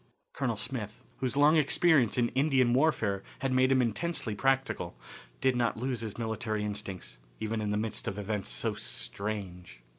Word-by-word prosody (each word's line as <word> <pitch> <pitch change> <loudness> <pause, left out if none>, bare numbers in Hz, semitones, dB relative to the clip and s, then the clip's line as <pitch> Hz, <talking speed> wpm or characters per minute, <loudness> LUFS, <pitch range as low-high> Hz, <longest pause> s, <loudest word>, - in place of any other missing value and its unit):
Colonel 120 -5 -1
Smith, 110 -1 -5
whose 130 +1 -2
long 150 +3 +6
experience 150 -4 +4
in 120 -1 +3
Indian 130 -3 +3
warfare 120 -9 +2 0.2
had 135 -1 0
made 130 +1 +4
him 130 -1 +4
intensely 120 0 -2
practical, 135 +5 0 0.4
did 130 -1 +3
not 120 -2 +1
lose 125 -1 -2
his 110 -3 -5
military 110 -2 -2
instincts, 100 -11 -5 0.2
even 110 0 -2
in 105 - -1
the 105 - 0
midst 110 0 -2
of 95 - -3
events 105 0 -3
so - - -1
strange. 95 - -4
115 Hz, 160 wpm, -30 LUFS, 105-130 Hz, 0.4 s, long